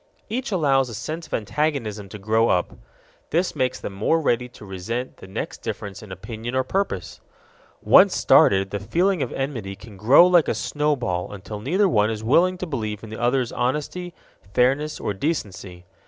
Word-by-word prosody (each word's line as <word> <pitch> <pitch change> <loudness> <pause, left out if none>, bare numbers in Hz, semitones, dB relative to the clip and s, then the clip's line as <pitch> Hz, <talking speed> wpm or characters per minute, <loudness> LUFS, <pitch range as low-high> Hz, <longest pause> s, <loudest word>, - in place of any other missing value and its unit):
Each 255 +4 -3
allows 135 -8 +2
a 115 - -7
sense 160 +8 -5
of - - -13
antagonism 110 -4 -2
to 105 - -8
grow 110 +3 +2
up. 90 - +1 0.6
This 175 +2 0
makes 130 -2 0
them 100 - -6
more 110 +12 +1
ready 125 -5 0
to 110 - -13
resent 105 +7 -5
the - - -12
next 95 - -5
difference 100 -2 -6
in 105 -3 -11
opinion 110 +6 -6
or 130 - +2
purpose. 190 - -3 0.6
Once - - +6
started, 95 0 +4
the 100 - -2
feeling 170 - +1
of - - -2
enmity 120 -8 -4
can 100 +1 -13
grow 125 - +7
like 175 -3 +4
a - - 0
snowball 130 -12 -1
until 105 +1 -7
neither 185 - +2
one 105 - +2
is 110 -1 -4
willing 175 +10 +3
to 185 - -4
believe 110 - -4
in 110 - -9
the 110 - -6
other's 125 0 +1
honesty, 150 +7 -2 0.4
fairness, 140 +5 +2
or - - -2
decency. 95 - -4
120 Hz, 180 wpm, -23 LUFS, 105-150 Hz, 0.6 s, grow